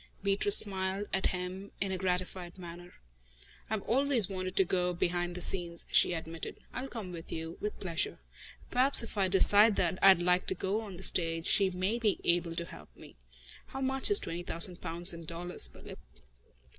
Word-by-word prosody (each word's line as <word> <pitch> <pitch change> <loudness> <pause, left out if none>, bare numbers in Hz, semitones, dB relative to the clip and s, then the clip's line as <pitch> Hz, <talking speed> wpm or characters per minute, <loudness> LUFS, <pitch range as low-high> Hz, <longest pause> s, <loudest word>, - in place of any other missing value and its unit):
Beatrice 200 +1 +2
smiled 190 0 -3
at 190 - +1
him 185 +2 -6
in 195 -1 -2
a 190 - -2
gratified 180 -1 -4
manner. 175 0 -11 0.7
"I've 220 -2 -3
always 260 -3 +3
wanted 185 -1 -5
to 190 - +4
go 180 0 -1
behind 175 0 -2
the 180 - -5
scenes," 170 -1 0
she - - +3
admitted. 165 0 -7 0.2
"I'll 260 +2 -5
come 220 -8 -8
with 165 -2 -10
you, 165 0 -7
with 210 - -5
pleasure. 170 -4 -3 0.5
Perhaps 255 0 +5
if 230 - -8
I 195 -2 +1
decide 205 +3 +6
that 180 0 -1
I'd 190 -3 +5
like 180 +1 +1
to - - 0
go 200 +4 -3
on 200 -5 -10
the 190 - -9
stage, 165 -3 +2
she 195 -2 +5
may 185 +5 -2
be 215 -4 0
able 170 -1 0
to 170 - -4
help 75 - -13
me. - - -15 0.5
How 270 - -8
much 265 0 +2
is 410 - +7
twenty 170 - -5
thousand 175 +1 +3
pounds 170 +2 -1
in 170 0 -10
dollars, 170 - -1
Philip?" - - -13
185 Hz, 185 wpm, -30 LUFS, 175-200 Hz, 0.7 s, is